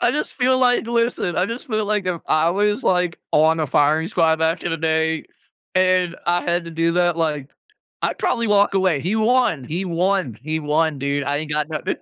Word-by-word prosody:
I 360 - +3
just 300 - -3
feel 255 0 +2
like 245 -2 +2
listen, 235 -6 -1
I 180 - +1
just 235 +3 -7
feel 215 -1 -1
like 210 -2 -1
if 175 -2 -2
I 155 +2 +2
was, 205 +3 0
like, 180 -2 +1
on 160 +1 +3
a 155 - 0
firing 150 +4 +2
squad 165 -5 +2
back 160 +2 0
in 175 - -1
the 165 - -1
day, 160 0 0 0.5
and 185 -2 +2
I 175 0 +1
had 175 0 -1
to 170 - -8
do 165 +1 0
that, 175 -1 +2
like, 150 -4 -2 0.5
I'd - - -1
probably 230 -2 0
walk 205 -1 +3
away, 185 -6 +2
he 180 +9 -2
won 220 - +2
he 170 +9 -4
won 180 - -1
he 155 +1 -2
won, 150 0 0
dude. 140 +1 -1
I 145 +1 -1
ain't 155 0 -5
got 150 +1 -1
nothing. 155 - -3
170 Hz, 215 wpm, -21 LUFS, 160-200 Hz, 0.5 s, I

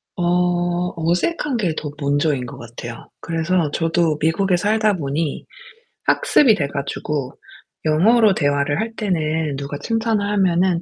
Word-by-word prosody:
어 175 0 0
어색한 180 - 0
게 180 -7 0
더 150 - -5
먼저인 145 -2 0
것 - - -9
같아요. 120 0 -9
그래서 165 -1 0
저도 165 -1 +1
미국에 175 +4 +2
살다 215 +2 +2
보니 150 0 -3 0.6
학습이 290 - +4
돼 140 -6 -1
가지고 140 -1 -4 0.5
영어로 205 +7 +4
대화를 145 -1 0
할 225 +1 -3
때는 160 -7 -1
누가 140 +1 -5
칭찬을 225 -2 0
하면은 185 -3 +2
170 Hz, 270 characters per minute, -20 LUFS, 145-195 Hz, 0.6 s, 학습이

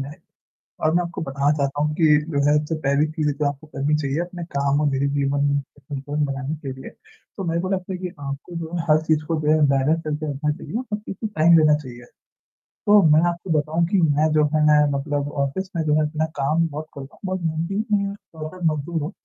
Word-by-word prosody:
जाए 140 +2 -8 0.7
और 155 - +3
मैं 175 - +3
आपको 170 -1 -6
बताना 140 +1 +1
चाहता 140 +1 0
हूँ 150 0 0
कि 160 -2 +3 0.2
जो 140 - 0
है 150 - +5
जो 160 - -2
पहली 140 +2 +3
चीज़ 155 -1 -1
जो 150 - 0
आपको 145 +2 -5
करनी 145 +1 0
चाहिए 140 0 -1
अपने 175 0 -6
काम 140 +1 +2
और 150 - +2
निजी 135 +1 +1
जीवन 140 0 +1
में 145 0 +2 0.2
संतुलन 145 +1 -3
बनाने 140 +2 -3
के 145 -3 -7
लिए, 130 - -9 0.5
तो 195 - -3
मेरे 170 -1 0
को 185 - -3
लगता 190 -1 -2
है - - -3
कि 185 - -3
आपको 140 +5 -6
जो 165 -1 -5
है 170 - -1
हर 155 +1 +5
चीज़ 155 -1 +2
को 165 +1 -1
जो 150 0 +2
है 155 0 +3
बैलेंस 140 +4 +2
करके 150 0 -2
रखना 150 +2 -1
चाहिए 150 - -8
हर 230 -4 -3
चीज़ 210 - -7
को 220 - -1
टाइम 165 +2 +7
देना 155 -1 +5
चाहिए। 125 -5 -10 0.8
तो 205 0 +7
मैं 155 +1 +6
आपको 170 +2 -6
बताऊँ 160 +3 0
कि 200 - +1
मैं 155 0 +3
जो 150 -1 +4
है 150 -1 +5
मतलब 145 +1 -2
ऑफिस 190 +8 -4
में 165 - 0
जो 150 -1 +1
है 155 - +3
अपना 155 +1 -1 0.2
काम 155 +4 +2
बहुत 155 0 -6
करता 135 +1 -9
हूँ - - -25
बहुत 185 -1 -2
मेहनती 165 +6 -1
हूँ 200 0 +1 0.2
और 155 +3 -7
एक - - -13
मजदूर 155 +2 -3
हूँ 155 - -3
150 Hz, 235 wpm, -22 LUFS, 140-165 Hz, 0.8 s, टाइम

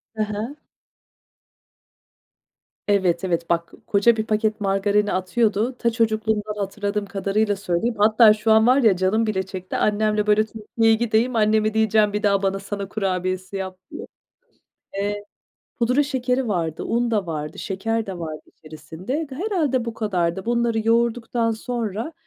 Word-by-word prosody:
He 215 - 0
he. 215 +6 -4 2.3
Evet, 190 -4 +2
evet. 170 -2 -1
Bak, 170 0 -1
koca 215 +3 +4
bir 220 - -1
paket 215 0 0
margarini 200 +1 +1
atıyordu. 215 +5 0
Ta, 235 - +2
çocukluğumdan 220 -2 0
hatırladığım 205 +1 -2
kadarıyla 200 +2 0
söyleyeyim. 200 +4 -1
Hatta 215 +1 +6
şu 215 +1 0
an 220 +1 +5
var 255 +2 +5
ya 220 -8 +4
canım 195 +5 +1
bile 190 -3 0
çekti. 185 -1 -7
Annemle, 210 0 +1
böyle, 215 +1 +4
Türkiye'ye 225 +1 0
gideyim, 235 +2 +1
anneme 215 0 +2
diyeceğim 220 -1 +3
bir 210 - -2
daha 200 -1 +3
bana 195 0 0
Sana 200 0 -5
kurabiyesi 185 -1 -2
yap 190 -1 -5
diye. - - -7 0.9
Eee, 205 +1 -2 0.5
pudra 250 +5 +3
şekeri 260 -3 -1
vardı, 165 -5 -2
un 235 0 0
da 205 -5 0
vardı, 150 -1 -5
şeker 225 +3 -2
de 190 -3 -6
vardı 155 -2 -6
içerisinde. 160 - -6
Ga 270 -2 -10
herhâlde 315 - 0
bu 230 -1 -5
kadardı. 185 -3 -1
Bunları 235 -1 +1
yoğurduktan 235 0 +1
sonra, 225 - -4
215 Hz, 145 wpm, -22 LUFS, 195-230 Hz, 2.3 s, Hatta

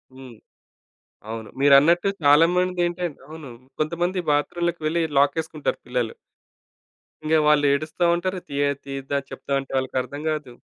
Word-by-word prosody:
హ్మ్. 130 -2 -12 1.0
అవును. 110 -1 -6
మీరన్నట్టు 145 +7 +5
చాలా 145 +3 +6
మందేంటంటే 180 -1 0 0.2
అవును. 155 -2 -10 0.3
కొంతమంది 175 +4 -1
బాత్రూమ్‌లోకి 170 +4 0
వెళ్లి 165 +2 +1 0.2
లాకేసుకుంటారు 155 +2 0
పిల్లలు. 125 -2 -2 1.1
ఇంగా 160 +1 +3
వాళ్ళు 150 -1 +4
ఏడుస్తా 155 +4 -1
ఉంటారు. 185 +2 -2
తియా 140 0 0 0.2
తీద్దా 135 0 -3
చెప్తాంటే 135 -1 -3
వాళ్ళకి 130 0 -2
అర్థం 145 +3 -8
గాదు. 150 -5 -4
150 Hz, 120 wpm, -23 LUFS, 140-170 Hz, 1.1 s, చాలా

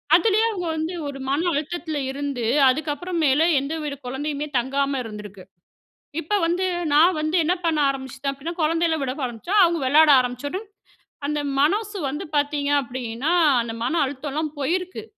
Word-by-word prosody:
அதுலே 415 +4 +3
அவங்க 365 -5 -4
வந்து 320 +3 -3
ஒரு 280 - -6
மன 320 +6 +1
அழுத்தத்துல 310 +1 -3
இருந்து, 280 -3 -4 0.3
அதுக்கப்புறமேலு 305 +1 +1
எந்த 275 +4 -4
வித 290 -2 -3
குழந்தையுமே 290 +3 -3
தங்காம 275 +2 0
இருந்திருக்கு. 210 -3 -9 0.8
இப்ப 320 - -5
வந்து 350 +3 0 0.3
நான் 330 +5 +5
வந்து 310 +3 -1
என்ன 345 +3 +2
பண்ண 320 -2 +1
ஆரம்பிச்சிட்டே 270 0 -4
அப்படின்னா, 280 +5 -6
குழந்தைகள 325 +1 +1
விட 260 -2 -1
ஆரம்பிச்ச. 240 - -7
அவங்க 340 -1 +2
விளையாட 300 +4 +6
ஆரமிச்சொன, 285 - -3 0.6
அந்த 300 0 -1 0.2
மனசு 415 +7 +1
வந்து 295 +3 -5
பாத்தீங்க 290 0 0
அப்படின்னா, 250 +3 -3 0.3
அந்த 230 -1 -5
மன 325 +8 0
அழுத்தோலா 285 +3 -4 0.2
போயிருக்கு. 365 +8 -2
295 Hz, 140 wpm, -23 LUFS, 265-330 Hz, 0.8 s, விளையாட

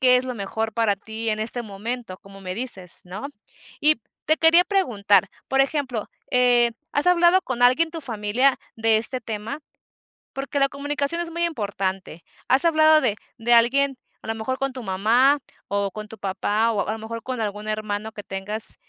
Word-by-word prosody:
qué 250 -1 +6
es 250 - +1
lo 255 - -4
mejor 220 +1 -3
para 220 -3 +1
ti 220 +3 -6
en 215 -1 0
este 225 +3 -3
momento, 220 0 -6
como 195 0 -14
me 185 -1 -5
dices, 195 -7 -5
¿no? 195 +7 -6 0.5
Y 305 -4 +3 0.2
te 315 +1 +3
quería 330 +2 +6
preguntar, 215 - +2 0.2
por 270 0 +3
ejemplo, 270 -6 -1 0.2
eh, 245 -2 +4 0.2
¿has 290 +4 +3
hablado 355 +1 +5
con 245 -2 -3
alguien 285 +7 +4
tu 330 0 -6
familia 235 +1 +1 0.2
de 225 -1 +3
este 235 +4 -1
tema? 225 +6 -5 0.7
Porque 275 +1 -3
la 275 - +4
comunicación 290 +3 -2
es 340 - -4
muy 340 +1 -2
importante, 195 - -3 0.2
¿has 265 +6 +3
hablado 310 -1 +5
de 210 - +1 0.2
de 240 +1 +2
alguien 270 +4 +4 0.3
a - - -12
lo 225 - -1
mejor 240 +4 -3
con 270 -1 -2
tu 255 - -7
mamá, 230 +9 +3 0.3
o 200 -1 0
con 215 +1 -7
tu 225 - -10
papá, 205 +3 0
o 205 -3 0
o - - -10
a - - +1
lo 225 - -6
mejor 230 +1 -6
con 255 -2 -4
algún 210 0 -3
hermano 215 0 -3
que 205 -1 -9
tengas? 205 +3 -1
230 Hz, 190 wpm, -23 LUFS, 210-275 Hz, 0.7 s, qué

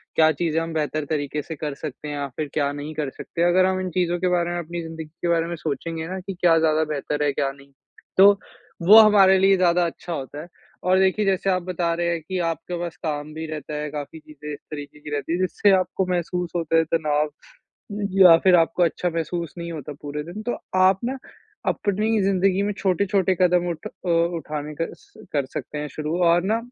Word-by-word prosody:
क्या 160 0 +5
चीज़ें 160 +1 -1
हम 165 0 -4
बेहतर 155 -1 -1
तरीके 150 -1 -2
से 160 +3 -7
कर 150 -1 -4
सकते 145 +1 -7
हैं 145 - -4
या 140 -1 -3
फिर 155 -2 -3
क्या 140 -2 +1
नहीं 145 +2 -6
कर 150 -2 -2
सकते। 165 - -6
अगर 180 +1 +4
हम 190 0 +1
इन 185 - -3
चीज़ों 175 0 0
के 185 - 0
बारे 175 -1 +1
में, 175 - -2
अपनी 170 +1 -5
ज़िन्दगी 160 -1 -7 0.2
के - - -1
बारे 165 -1 +2
में 170 - -4
सोचेंगे 160 +1 -4
ना 190 +2 -4
कि 190 +1 -6
क्या 170 -2 +5
ज़्यादा 160 -1 +2
बेहतर 150 -1 -2
है 145 - +2
क्या 135 -1 0
नहीं, 140 0 -17 0.5
तो 200 +1 +7 0.4
वो 205 +6 +9
हमारे 200 -3 +7
लिए 195 +1 +5
ज़्यादा 175 -1 +3
अच्छा 170 +1 -5
होता 145 0 -6
है। 165 - -10 0.4
और 185 +1 +4
देखिए 190 +2 +2
जैसे 195 0 +1
आप 185 -1 +1
बता 175 -2 -1
रहे 170 0 -1
हैं 170 -1 -1
कि 185 +4 -5
आपके 170 +2 -4
पास 170 -1 -4
काम 150 -1 -3
भी 160 +1 -5
रहता 155 0 -6
है, 150 0 -3
काफ़ी 150 +2 -6
चीज़ें 150 -1 -10
इस - - -8
तरीके 145 0 -8
की 150 - -9
रहती 145 +3 -2
है 175 - -1
जिससे 185 +2 +2
आपको 185 +1 0
महसूस 180 -1 -2
होता 165 -1 +1
है 165 - +5
तनाव 150 -2 +1
अ, 150 - -17 0.8
या 185 -4 +8
फिर 185 -1 +6
आपको 170 +1 +3
अच्छा 175 +1 0
महसूस 165 -1 -3
नहीं 170 0 -5
होता 150 -2 -6
पूरे 150 0 -5
दिन, 175 +7 -8
तो 240 - -2 0.2
आप 190 +1 +5
ना 260 +2 -2 0.5
अपनी 210 +2 0
ज़िन्दगी 195 0 +2
में 205 - 0
छोटे-छोटे 190 0 +1
कदम 180 -1 +3
उठ 165 -2 -5
अ, 180 - -8
उठाने 165 -3 -1
का 165 - -1
स - - -22 0.2
कर 140 -3 +1
सकते 140 +3 -6
हैं 150 0 -3
शुरू 155 +3 -3
और 170 +1 +4
ना 215 +4 +1
170 Hz, 225 wpm, -23 LUFS, 150-185 Hz, 0.8 s, वो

